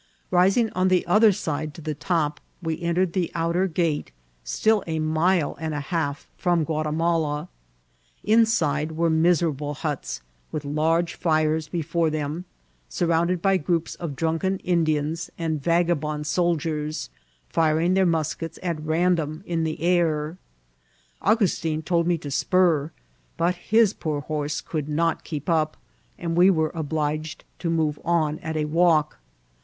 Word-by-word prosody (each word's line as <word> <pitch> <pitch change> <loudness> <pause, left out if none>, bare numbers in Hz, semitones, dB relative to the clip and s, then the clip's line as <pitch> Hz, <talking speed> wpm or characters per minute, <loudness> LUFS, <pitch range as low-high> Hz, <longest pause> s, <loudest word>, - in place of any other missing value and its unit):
Rising 195 +5 +3
on 185 +1 +1
the 185 -1 +2
other 210 +5 +5
side 155 -4 -3
to - - -10
the 155 0 -3
top, 150 -1 -1 0.2
we 165 -2 -3
entered 170 +1 +1
the 180 -3 0
out 165 0 0
er 185 +2 +2
gate, 160 - -1 0.3
still 210 - +2
a 160 -1 -1
mile 160 +1 +1
and 160 -1 -3
a - - -1
half 145 -1 -3
from 175 -2 +1
Guatimala. 155 0 0 0.7
Inside 170 -9 +2
were 165 +1 +1
miserable 160 -3 +1
huts, 140 - -4 0.3
with 150 -1 -4
large 165 +4 +1
fires 155 -1 +1
before 170 -1 0
them, 155 +3 -3 0.4
sur 175 - -1
rounded 170 +1 +1
by 195 -1 +4
groups 165 0 -1
of 165 -5 -6
drunken 165 +5 0
Indians 160 -1 0
aiul 160 -2 -1
vagabond 155 -2 0
iloldiers, 155 -2 -1 0.4
firing 160 - +2
their 190 0 +4
muskets 165 0 -2
at 170 -4 -2
random 160 0 0
in 165 -2 -1
the 155 -1 -3
air. 170 -2 +1 0.8
Au - - +4
gustin 165 -7 -1
told 170 0 +1
me 175 -1 +2
to 145 -3 -7
spur; 160 0 +2 0.5
but 170 +2 +2
his 215 +3 +3
poor 150 -3 -3
horse 150 0 -3
could 150 -3 -4
not 165 +2 0
keep 150 -3 -6
up, 155 -3 +1 0.4
and 165 -1 -3
we 180 +2 +6
were 160 -4 +2
obliged 155 0 -3
to 170 - -2
move 155 -3 0
on 155 -3 +1
at 160 0 -4
a 150 - 0
walk. 155 - +2
160 Hz, 150 wpm, -24 LUFS, 155-175 Hz, 0.8 s, we